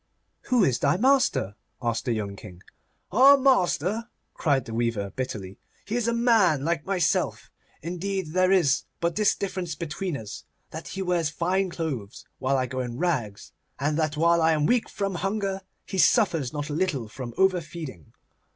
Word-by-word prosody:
'Who 250 -5 +3
is 130 -8 +2
thy 140 +4 +2
master?' 255 - +2 0.3
asked 115 -1 -2
the 120 - +1
young 100 -3 -3
King. 90 -2 -12 0.5
'Our 270 +7 +7
master!' 230 - +2 0.2
cried 140 -6 +1
the 115 - -7
weaver, 115 -4 -1
bitterly. 105 -7 -5 0.3
'He 210 - -3
is 240 -2 0
a - - +2
man 220 - +3
like 170 -1 -1
myself. 185 -4 0 0.3
Indeed, 180 0 -3
there 185 +1 +3
is 170 -9 +3
but 170 0 -1
this 210 -1 +3
difference 185 -4 -4
between 170 0 -4
us—that 115 +8 -10
he 195 - -4
wears 175 -4 +1
fine 185 +4 0
clothes 140 - -5
while 135 +1 +1
I 130 - +1
go 130 +1 -5
in 120 -2 -4
rags, 125 - -2 0.3
and 145 +2 0
that 155 -1 0
while 170 +1 +4
I 160 0 +4
am 150 -1 +1
weak 245 +7 +2
from 195 -1 -3
hunger 195 +1 -2 0.2
he 190 - -4
suffers 165 - +3
not 145 0 -4
a - - -2
little 150 -8 -1
from 120 +1 -8
overfeeding. 170 - -1
165 Hz, 170 wpm, -26 LUFS, 130-195 Hz, 0.5 s, Our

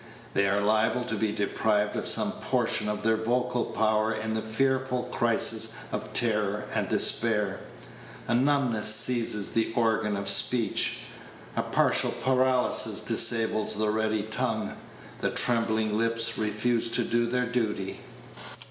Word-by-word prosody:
They 100 0 +1
are 100 +1 0
liable 110 +3 0
to 120 -2 -4
be 105 0 -1
deprived 105 0 -1
of - - -3
some - - +4
portion 105 - -1
of 105 0 -4
their 110 0 +1
vocal 125 +2 -2
power 110 0 0
in 110 0 -4
the 110 - -2
fearful 130 +3 -2
crisis - - +2 0.2
of - - -5
terror 105 -3 0
and - - -2
despair. 105 -4 0 0.7
A 120 - -1
numbness 120 -5 +3
seizes 115 -3 +1
the 115 0 -1
organ 110 -3 0
of 100 0 -5
speech; 120 -3 +3 0.5
a - - 0
partial - - +1
paralysis 130 -1 +1
disables 110 -2 +3
the 105 0 -1
ready 110 -1 -1
tongue; 110 +1 -3 0.4
the - - -1
trembling 110 -3 0
lips 115 +1 +2
refuse 115 +2 -1
to 120 +1 0
do 120 +1 -1
their 125 +1 -1
duty. 110 -5 -3
110 Hz, 140 wpm, -26 LUFS, 105-120 Hz, 0.7 s, some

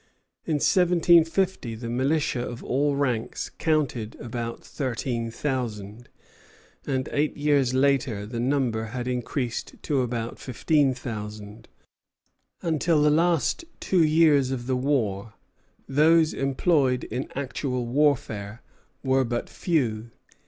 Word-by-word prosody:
In 155 - 0
1750 175 - +3
the 115 +1 -7
militia 130 +2 0
of 120 -1 -6
all 140 +2 +1
ranks 125 -5 -2
counted 140 -9 0
about 115 0 -5
thirteen 120 -3 -3
thousand; 115 -4 -4 0.8
and 130 -2 -1
eight 150 +1 0
years 145 -4 +2
later 130 -6 +1
the 115 +2 -5
number 120 -3 0
had 120 +2 -5
increased 125 0 -3
to 140 -3 +1
about 120 -2 -3
fifteen 135 +1 +1
thousand. 105 -3 -7 1.0
Until 160 -1 +2
the 150 - +4
last 165 - +2 0.2
two 180 -3 +2
years 155 -4 +4
of 130 -2 -3
the 130 0 0
war, 115 -6 -1 0.5
those 160 +3 +4
employed 135 -1 +1
in 125 +4 -4
actual 130 -2 -2
warfare 120 -5 0 0.4
were 130 0 +3
but 120 -1 -3
few. 120 -10 -1
130 Hz, 115 wpm, -25 LUFS, 115-150 Hz, 1.0 s, the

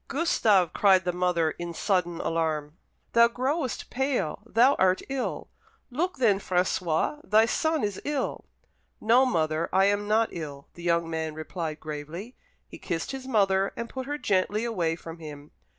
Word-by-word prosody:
"Gustave!" 215 - +2
cried 190 -2 +4
the 180 - 0
mother, 175 -3 +1
in 170 0 -6
sudden 175 -4 0
alarm, 155 -2 -1 0.4
"thou 235 0 +7
growest 260 +2 -2
pale 250 - -1
thou 245 +5 +5
art 185 0 +3
ill! 270 -2 -3 0.4
Look 330 +6 -1
then, 215 -7 +3
François, 180 - 0
thy 215 +3 +4
son 315 +5 0
is 205 -2 -2
ill!" 290 -2 -2 0.5
"No, 245 +4 +4
mother, 160 -6 0
I 195 - +4
am 205 +1 +1
not 220 +2 +3
ill," 145 -4 -7
the 175 - -12
young 170 -1 +1
man 160 -1 -3
replied 155 0 -5
gravely. 155 - -7 0.3
He - - -11
kissed 165 -3 -3
his 265 -1 -7
mother, 195 -5 +2
and 235 0 -4
put 260 -1 -6
her 290 +1 -2
gently 205 -3 0
away 175 -8 0
from 165 0 -10
him. 150 -2 -10
190 Hz, 160 wpm, -27 LUFS, 165-235 Hz, 0.5 s, thou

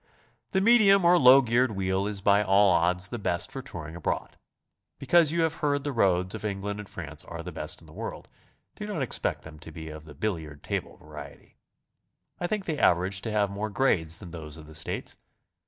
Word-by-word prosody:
The 190 - +1
medium 200 -4 +6
or 175 +1 +6
low 130 +1 +8
geared 120 0 +2
wheel 95 0 0
is 105 -2 -3
by 100 0 +4
all 100 0 +5
odds 90 +1 +1
the 120 - -5
best 85 -4 -1
for 135 - -5
touring 80 -9 -8
abroad. 85 - -3 0.6
Because 155 +3 +4
you 170 0 +1
have 160 -1 +1
heard 145 -1 0
the 145 - -2
roads 95 -6 +1
of - - -6
England 100 0 -3
and 105 - -8
France 75 -3 -7
are - - -7
the - - -6
best - - -5
in - - -16
the - - -15
world, - - -6 0.5
do - - -7
noit - - -2
expect - - -2
them 75 -1 -12
to 80 0 -11
be 80 -1 -8
of 75 0 -9
the 75 -2 -12
billiard 80 -6 -4
table - - -4
variety. 75 -2 -12 0.8
I 175 - -1
think 205 0 -2
they 160 -3 -2
average 95 +2 +2
to 110 - -4
have 105 -2 +1
more 105 +2 -3
grades 90 -8 +1
than 90 - -10
those 80 -2 -8
of 80 - -11
the 80 - -13
States. 80 +1 -3
100 Hz, 210 wpm, -27 LUFS, 80-130 Hz, 0.8 s, low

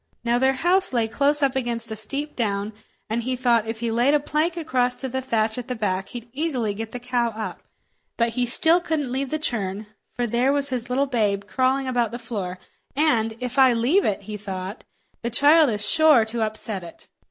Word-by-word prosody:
Now 240 0 +1
their 265 +1 +3
house 350 +5 +2
lay 230 -2 +1
close 285 +5 +1
up 270 -1 +2
against 235 -3 -3
a - - -3
steep 275 +8 -5
down, 205 -2 -2 0.3
and 225 +2 -1
he 255 +2 -2
thought 240 -3 +2
if 225 0 -5
he 235 -1 -1
laid 245 +6 +3
a - - +3
plank 310 +4 -1
across 255 -6 0
to 265 - -4
the 260 +1 -3
thatch 225 -2 -1
at 245 - -7
the 250 - -3
back 195 -3 -2
he'd 240 -1 -8
easily 260 -8 -1
get 225 +2 -6
the 250 - -6
cow 245 -1 0
up. 220 -1 -6 0.6
But 235 -1 +1
still 255 +8 +5
he - - -17
couldn't 295 -7 -2
leave 265 +1 -2
the 310 - -1
churn, 210 -8 -3 0.3
for 245 - -1
there 240 +4 +1
was 280 -1 0
his 245 -1 -2
little 265 +3 +1
babe 210 -7 0
crawling 260 +4 0
about 245 -3 +1
the 235 - -6
floor, 200 -7 -5 0.4
and 235 -7 +1
"if 250 +2 -3
I 260 -2 +6
leave 260 +13 +2
it," 200 -1 -1
he 210 +1 -6
thought, 195 +1 -6 0.4
"the 235 - -2
child 290 +5 +5
is 210 -2 -2
sure 305 -6 +5
to 225 +1 -4
upset 215 -3 -3
it!" 170 - -12
240 Hz, 215 wpm, -23 LUFS, 220-270 Hz, 0.6 s, I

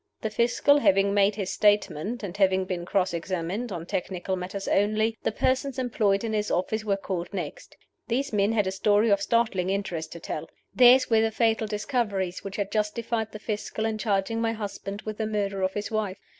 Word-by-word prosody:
The 220 - -2
Fiscal 245 +6 +3
having 195 -5 +3
made 200 0 +3
his 195 -3 -3
statement, 210 +1 +1
and 190 -2 -5
having 190 -1 +3
been 180 -2 -4
cross 190 -2 +1
examined 185 +6 -3
(on 170 -3 -5
technical 185 +1 -3
matters 190 +2 -5
only), 215 +2 +2
the - - 0
persons 260 +4 0
employed 215 -6 +1
in 225 -1 -2
his 210 -1 0
office 215 +4 -1
were 200 -2 0
called 180 -3 -4
next. 175 -7 -6 0.3
These 255 +2 -1
men 205 +1 +2
had 210 -3 +2
a 190 - -1
story 205 +3 +3
of 200 0 +3
startling 200 -5 +1
interest 190 -5 -3
to 170 - -8
tell. 155 - -5 0.2
Theirs 250 0 +6
were 220 -1 +5
the 225 - +2
fatal 225 0 +1
discoveries 210 -4 -2
which 195 0 -6
had 200 -1 -2
justified 220 +1 -1
the 215 - -7
Fiscal 215 0 -3
in 220 -1 -2
charging 210 +1 0
my 225 0 +1
husband 200 -1 -6
with 215 0 -6
the 220 - 0
murder 200 -2 -2
of 190 0 0
his 205 +1 -3
wife. 210 -3 -1
205 Hz, 200 wpm, -26 LUFS, 190-220 Hz, 0.3 s, Theirs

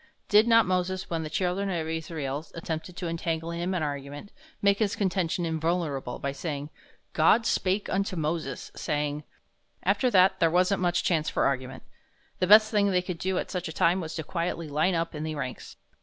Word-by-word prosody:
Did 210 +2 +6
not 230 -1 +6
Moses, 185 0 -1
when 165 -1 -1
the 155 - -5
children 185 +4 -1
of 165 -4 -2
Israel 155 -3 -3
attempted 165 +1 -5
to 180 - -3
entangle 165 0 -2
him 175 +2 -2
in 170 - -1
argument, 145 +4 -5 0.3
make 200 0 +3
his 210 -3 +1
contention 185 -3 0
invulnerable 160 -5 -1
by 140 - -3
stating, 145 0 -5 0.4
"God 215 +9 +4
spake 195 -1 0
unto 195 0 -1
Moses, 155 -4 -3
saying, 150 -1 -2 0.3
" - - -40
After 255 - +1
that 190 -2 +4
there 165 - +4
wasn't 185 +3 +2
much 175 -1 +1
chance 160 -3 +1
for - - +1
argument. 130 -1 -2 0.6
The 185 - +1
best 215 +2 +7
thing 205 -2 +3
they 180 -2 +1
could 180 -3 -5
do 190 0 -1
at - - -3
such 180 -2 -3
a - - -5
time 175 +3 +2
was 160 -2 -6
to 160 - -3
quietly 170 0 -3
line 155 +5 +1
up 165 0 -1
in 150 - -5
the 155 0 -3
ranks. 130 -3 -6
170 Hz, 195 wpm, -27 LUFS, 155-185 Hz, 0.6 s, best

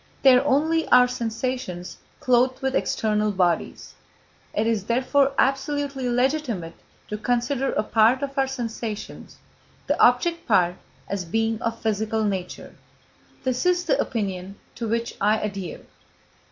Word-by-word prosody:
They 265 -2 +8
are 250 - +4
only 310 +4 +2
our 250 0 +6
sensations 230 -6 -4 0.2
clothed 255 +1 +2
with 265 0 0
external 210 -1 0
bodies. 180 -4 -1 0.6
It 215 - 0
is 220 -4 0
therefore 265 +4 +2
absolutely 275 -1 0
legitimate 245 - -1 0.4
to 210 - -4
consider 245 +4 0
a - - 0
part 225 +5 +3
of 275 -1 -4
our 270 -1 +2
sensations, 230 -4 -6 0.5
the - - 0
object 335 +8 +3
part, 180 -4 +3 0.3
as 200 -2 -3
being 225 +5 -1
of 230 -1 -2
physical 220 0 -1
nature. 190 -4 -4 0.7
This 255 -1 -1
is 360 0 +2
the 320 - +1
opinion 195 -4 -3 0.2
to 230 - -4
which 230 +1 -1
I 210 +2 +3
adhere. 200 -5 -5
235 Hz, 135 wpm, -24 LUFS, 210-265 Hz, 0.7 s, They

